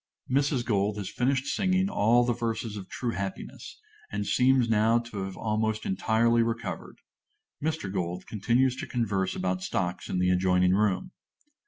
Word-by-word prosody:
(_Mrs. 135 -2 +1
Gold 105 -2 +1
has 100 -2 -4
finished 135 +1 0
singing 190 +1 +1
all 120 - +3
the 120 - +1
verses 115 -1 -3
of 95 -3 -8
"True 120 -2 -3
Happiness," 100 -3 -6 0.3
and 105 0 -2
seems 130 0 +3
now 110 +1 +3
to 120 -2 -5
have 95 -1 -7
almost 110 0 -1
entirely 115 - +2
recovered. 115 -2 -3 0.7
Mr. 155 -11 -2
Gold 90 -1 -3
continues 120 +5 +1
to - - -5
converse 100 -6 -1
about 90 0 -1
stocks 90 -1 -2
in - - -1
the 90 0 +2
adjoining 90 0 +3
room. 105 - +1
110 Hz, 155 wpm, -28 LUFS, 95-120 Hz, 0.7 s, all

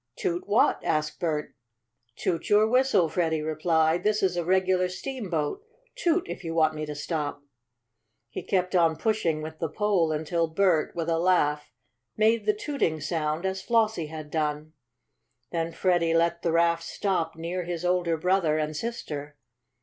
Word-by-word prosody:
"Toot 365 -1 -2
what?" 415 - +3
asked 155 0 -1
Bert. 155 -4 -2 0.6
"Toot 165 - -2
your 210 +1 +5
whistle," 245 -7 +3
Freddie 160 -2 0
replied. 160 +1 +1
"This 210 0 +1
is 185 -2 +2
a 175 - -1
regular 185 +1 +2
steamboat. 185 - -3 0.3
Toot 365 -6 +1
if - - -6
you 165 -1 -4
want 155 -1 +3
me 155 0 -5
to 150 - -5
stop." 145 -1 -3 0.8
He 120 - -6
kept 185 -1 -1
on 165 -2 +4
pushing 170 -7 0
with 155 0 -8
the 165 - -2
pole 195 -4 +1
until 160 +2 0
Bert, 165 -1 +1
with 165 -1 -2
a 165 -1 +1
laugh, 150 -5 +1 0.5
made 220 +1 +2
the 425 - +3
tooting 285 - -1
sound 155 +2 -2
as 190 0 -2
Flossie 220 -8 +1
had 155 -2 -8
done. 155 0 -2 0.8
Then 165 0 -2
Freddie 170 -2 +1
let 170 +1 +2
the 170 - 0
raft 170 0 +3
stop 165 -1 -2
near 170 +3 -3
his 175 0 -4
older 175 -2 +1
brother 175 -2 +2
and 155 0 -2
sister. 150 -9 -5
170 Hz, 160 wpm, -27 LUFS, 155-190 Hz, 0.8 s, your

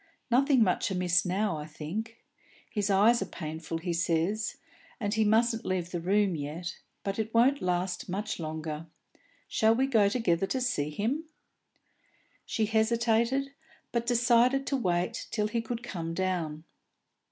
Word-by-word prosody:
"Nothing 265 0 +5
much 185 -1 +1
amiss 180 -1 +2
now, 195 -1 0
I 150 0 -6
think. 205 +10 -5 0.5
His 205 -2 -1
eyes 210 +4 +5
are - - 0
painful, 160 -2 -5
he 170 +1 -3
says, 175 +6 0 0.4
and 205 -3 -1
he 220 0 +3
mustn't 225 +2 +3
leave 180 -2 -2
the 175 - -2
room 195 +1 +2
yet, 160 +4 -5 0.2
but 195 +1 -3
it 220 0 -2
won't 265 +5 +4
last 180 0 -1
much 205 +3 -3
longer. 155 0 -5 0.6
Shall 220 +1 +3
we 260 +3 +2
go 220 -7 +4
together 195 -6 +1
and 260 -1 0
see 150 -12 0
him?" 230 - -2 1.2
She 220 - 0
hesitated, 235 +4 +2 0.4
but 235 0 -1
decided 245 +2 +4
to 275 - 0
wait 180 -2 -1
till 210 -2 0
he 230 +2 -1
could 235 +1 -5
come 165 -7 -4
down. 170 -5 -2
205 Hz, 150 wpm, -29 LUFS, 175-230 Hz, 1.2 s, Nothing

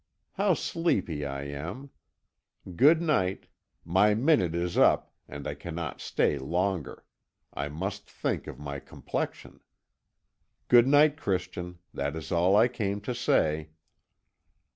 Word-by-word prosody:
How 195 -2 +2
sleepy 95 - -1
I 70 0 -5
am! 85 - -7 0.8
Good 160 - +5
night. 95 - 0 0.4
My 95 +5 +4
minute 115 - +2
is 85 0 -2
up, - - +3
and 70 -1 -8
I - - -2
cannot 80 -4 -6
stay 70 - +1
longer; 90 +3 -2 0.5
I 70 +1 -3
must 95 +7 -5
think - - -3
of - - -7
my 70 -1 -6
complexion. - - -5 1.1
Goodnight, 145 +5 +6
Christian; 90 - -3 0.2
that 70 +2 -2
is 80 - -7
all 90 +3 +3
I 110 +3 +6
came 105 -5 -2
to 125 +5 -3
say." 80 -10 +1
90 Hz, 120 wpm, -28 LUFS, 80-120 Hz, 1.1 s, Goodnight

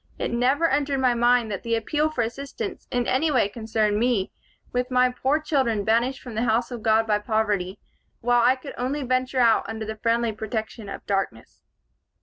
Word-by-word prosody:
It - - -2
never 265 +7 +2
entered 285 -3 0
my 255 -2 +3
mind 240 -1 +2
that 195 - -4
the 230 0 0
appeal 295 +7 0
for 260 -6 -1
assistance 280 - -6
in 245 -1 0
any 275 +7 +1
way 255 -8 +3
concerned 215 -1 -1
me, 235 -5 +1 0.4
with 250 0 -1
my 250 0 +3
poor 265 +4 0
children 260 -9 0
banished 235 +5 +1
from 245 - -9
the 220 - -1
house 235 +2 +1
of 240 -2 -6
God 220 0 +3
by 210 -1 +1
poverty, 210 -3 -1 0.4
while 245 0 +3
I 250 +2 +5
could 265 +1 -9
only 275 +4 -2
venture 255 +1 -1
out 230 -2 +3
under 220 0 -4
the 220 0 -5
friendly 230 0 +1
protection 220 0 -5
of - - -8
darkness. 195 - -3
235 Hz, 190 wpm, -24 LUFS, 220-255 Hz, 0.4 s, I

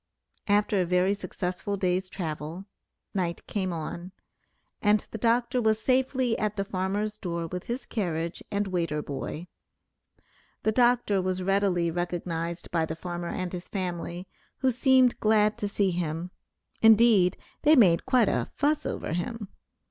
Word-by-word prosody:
After 205 -1 +3
a - - +1
very 180 +2 +2
successful 190 +1 -4
day's 185 0 0
travel, 160 0 -5 0.5
night 175 -3 -2
came 190 -3 -2
on, 170 +2 -6 0.7
and 210 -1 +4
the 220 - -5
doctor 240 +2 +2
was 220 -1 +2
safely 255 -1 +1
at 215 -1 -1
the 195 -1 -2
farmer's 200 +3 -2
door 170 -2 -3
with 180 +2 -6
his 240 +3 -4
carriage 170 -6 -3
and 205 0 0
waiter 170 -5 -1
boy; 150 +3 -5 1.2
the 220 - +2
doctor 240 -4 +3
was 185 0 -2
readily 190 -3 +1
recognized 170 0 -3
by 165 -2 +1
the 160 0 -3
farmer 175 0 -5
and 185 -1 -4
his 180 0 -6
family, 180 -1 -4 0.3
who 260 -1 +3
seemed 255 0 +4
glad 215 -1 +3
to 205 - -1
see 200 -1 +1
him; 170 0 -3 0.5
indeed, 220 -5 +6 0.2
they 305 +1 +6
made 185 - +5
quite 250 -5 +4
a - - 0
"fuss" 300 +1 +1
over - - -3
him. 205 +4 -4
190 Hz, 150 wpm, -27 LUFS, 175-220 Hz, 1.2 s, indeed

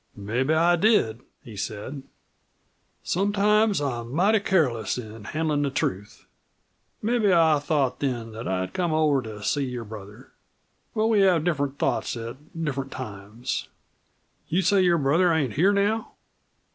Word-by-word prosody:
"Mebbe 115 +7 -2
I 170 +2 +4
did," 165 - +2 0.2
he 115 -6 -11
said; 110 +7 -5 1.0
"sometimes 205 +2 +2
I'm 120 -5 -3
mighty 205 +6 +4
careless 150 - +1
in 110 -3 -8
handlin' 155 +2 -1
the 145 - +1
truth. 105 -6 -3 0.8
Mebbe 225 -2 +2
I 160 -4 +4
thought 140 -4 0
then 120 -5 -2
that 115 +2 -7
I'd 95 0 -2
come 175 -3 0
over 150 -3 +3
to 110 -3 -8
see 140 +5 0
your 125 -2 -5
brother. 105 +3 -11 0.6
But 215 0 +2
we 220 -2 +3
have 185 -5 +4
different 145 -5 -1
thoughts - - -1
at 115 +2 -6 0.2
different 135 -4 -2
times. 110 -2 -5 0.8
You 185 +4 +1
say 200 0 +4
your 175 -2 +4
brother 165 +5 +3
ain't 145 -8 0
here 180 - +4
now?" 205 +2 0
145 Hz, 145 wpm, -25 LUFS, 115-180 Hz, 1.0 s, I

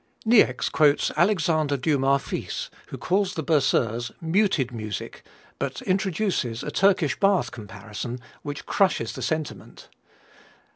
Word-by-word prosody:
Niecks 225 0 +4
quotes 150 -2 +3
Alexandre 160 -5 +2
Dumas 140 -1 +2
fils, - - -5 0.2
who - - -7
calls 195 +1 0
the 160 - -3
Berceuse 120 -6 +1
"muted 165 - +1
music," 110 -4 -6 0.4
but - - -3
introduces 185 - -1
a - - -4
Turkish 185 -7 +2
bath 195 - +2
comparison, 110 +2 -7 0.2
which 145 -1 -6
crushes 185 - +1
the - - -7
sentiment. 160 -1 -4
150 Hz, 115 wpm, -25 LUFS, 125-185 Hz, 0.4 s, Niecks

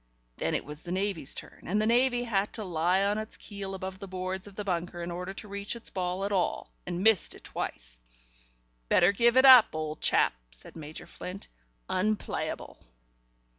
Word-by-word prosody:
Then - - 0
it - - -2
was 150 +1 -7
the 175 - -7
Navy's 190 -6 0
turn, - - -7
and 205 +4 +1
the 215 - +2
Navy 245 +1 +3
had 205 -4 0
to 220 - -3
lie 180 +1 +2
on 205 +1 +1
its 215 0 -6
keel 195 -2 -6
above 190 0 -6
the 195 - -7
boards 185 +1 -4
of 200 - -12
the 210 - -4
bunker, 175 -2 -2
in 175 - -4
order 180 +2 -4
to 215 - -6
reach 200 +2 -3
its 235 - -6
ball 185 +1 -2
at 200 - -2
all, 190 -3 0 0.2
and 175 +1 -2
missed 220 -5 +4
it - - -15
twice. - - -5 0.9
"Better 175 +2 +6
give 235 +4 +4
it 260 - +7
up, 255 -9 +9
old 155 -1 -4
chap," - - +3 0.2
said - - -8
Major 155 -1 -8
Flint. 185 +2 -8 0.4
"Unplayable." 210 +3 -2
190 Hz, 190 wpm, -29 LUFS, 175-210 Hz, 0.9 s, up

